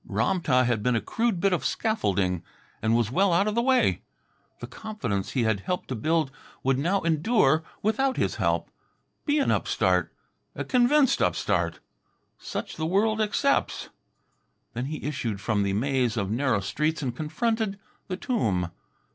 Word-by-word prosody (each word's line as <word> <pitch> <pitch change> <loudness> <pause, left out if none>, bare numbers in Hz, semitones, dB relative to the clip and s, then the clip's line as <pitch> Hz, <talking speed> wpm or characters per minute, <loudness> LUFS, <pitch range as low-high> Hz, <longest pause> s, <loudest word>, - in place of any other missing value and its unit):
Ram 190 -2 0
tah 130 -5 +3
had 120 -3 0
been 125 +3 +1
a - - +2
crude 225 - -1
bit 195 +1 +2
of 175 - 0
scaffolding, 100 - 0 0.4
and 110 +1 +2
was 115 -1 +1
well 190 +7 +3
out 185 +5 +3
of 215 - 0
the 235 - +2
way. 260 +1 +3 0.6
The - - -6
confidence 120 - -4
he 125 - +1
had 110 -3 +1
helped 180 - -3
to 130 - -2
build 155 +4 0 0.3
would 135 0 +2
now 185 +7 +1
endure 160 - +2 0.2
without 260 +5 +1
his - - 0
help. - - 0 0.6
Be 290 +1 +3
an 280 - +2
upstart. - - +1 0.4
A - - -3
convinced 260 +2 +3
upstart. - - 0 0.6
Such - - -5
the 160 0 -1
world 215 +5 +2
accepts. 215 +6 0 0.8
Then 120 +2 -3
he 150 +2 -5
issued 120 -8 -2
from 105 0 0
the 100 -1 0
maze 125 +1 0
of 100 -2 -1
narrow 125 -3 +1
streets 150 - -1
and 125 -3 -2
confronted 220 - -1 0.3
the 185 -2 -3
tomb. 100 - 0
155 Hz, 165 wpm, -26 LUFS, -, 0.8 s, tah